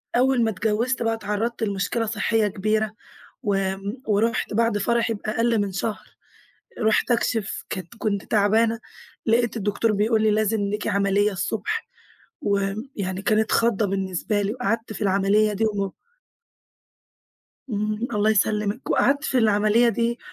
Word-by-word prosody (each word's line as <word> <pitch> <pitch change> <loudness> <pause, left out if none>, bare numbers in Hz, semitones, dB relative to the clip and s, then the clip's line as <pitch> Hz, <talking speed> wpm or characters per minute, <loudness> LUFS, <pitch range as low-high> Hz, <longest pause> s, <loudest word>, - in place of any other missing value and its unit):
أول 255 -1 +3
ما 225 - +2
اتجوزت 225 +5 0
بقى 225 0 +1
اتعرّضت 225 +2 -2
لمشكلة 200 +3 -1
صحية 220 0 +1
كبيرة، 215 +2 0 0.5
وآمم، 195 +3 -2
ورُحت 220 +1 +1
بعد 230 -2 +2
فرحي 230 +2 +1
بأقل 225 +2 0
من 200 -1 -2
شهر 210 +2 -3 0.7
رُحت 220 +2 +2
أكشف. 225 -3 0
كانت 185 +1 -6
كنت 200 -3 -1
تعبانة، 220 +2 +2 0.5
لقيت 235 +1 +2
الدكتور 210 +1 0
بيقول 215 +2 +2
لي 220 - +4
لازم 215 0 +1
ليكِ 205 +1 -2
عملية 200 +1 +2
الصبح، 435 - -3 0.5
ويعني 200 -2 -2
كانت 215 +1 +1
خضّة 230 -2 +2
بالنسبة 195 +2 -1
لي، 200 +1 -1
وقعدت 230 -2 -2
في 215 - -8
العملية 200 +2 +3
دي 220 +2 0
و 200 -3 -1 1.8
إمم، 215 +2 -2
الله 210 +1 +2
يسلمِك. 210 +3 0
وقعدت 285 +2 +2
في 260 - 0
العملية 215 +1 +4
دي 235 0 0
215 Hz, 135 wpm, -24 LUFS, 200-230 Hz, 1.8 s, لي